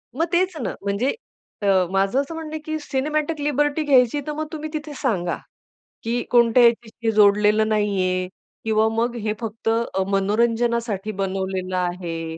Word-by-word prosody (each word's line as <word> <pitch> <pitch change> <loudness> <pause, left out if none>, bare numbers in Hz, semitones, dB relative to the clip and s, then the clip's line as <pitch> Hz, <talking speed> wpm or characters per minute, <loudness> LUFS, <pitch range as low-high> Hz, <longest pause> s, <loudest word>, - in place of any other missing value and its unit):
मग 325 - +1
तेच 365 0 +2
ना. - - -3
म्हणजे 200 +7 0 0.5
अ, 205 - -2 0.3
माझं 195 +6 +2
असं 320 +4 -7
म्हणणं 320 -1 -6
आहे, 315 - -3
की 310 +1 -3
सिनेमॅटिक 300 +3 -1
लिबर्टी 295 +1 +1
घ्यायची, 265 -2 +4
तर 300 - -1
मग 310 0 -3
तुम्ही 310 0 -5
तिथे 300 -1 -5
सांगा, 180 - 0 0.7
की 235 +2 -1
कोणत्याही 235 0 +6
व्यक्तीशी 230 0 -4
जोडलेलं 210 +1 +4
नाही 210 -1 +1
आहे 185 0 0 0.4
किंवा 220 0 +3
मग 235 +2 -1
हे 210 - +1
फक्त 225 -1 -6
अ, 225 -4 0
मनोरंजनासाठी 225 +1 +1
बनवलेलं 190 -1 -2
आहे. 170 -2 -3
230 Hz, 155 wpm, -22 LUFS, 200-285 Hz, 0.7 s, कोणत्याही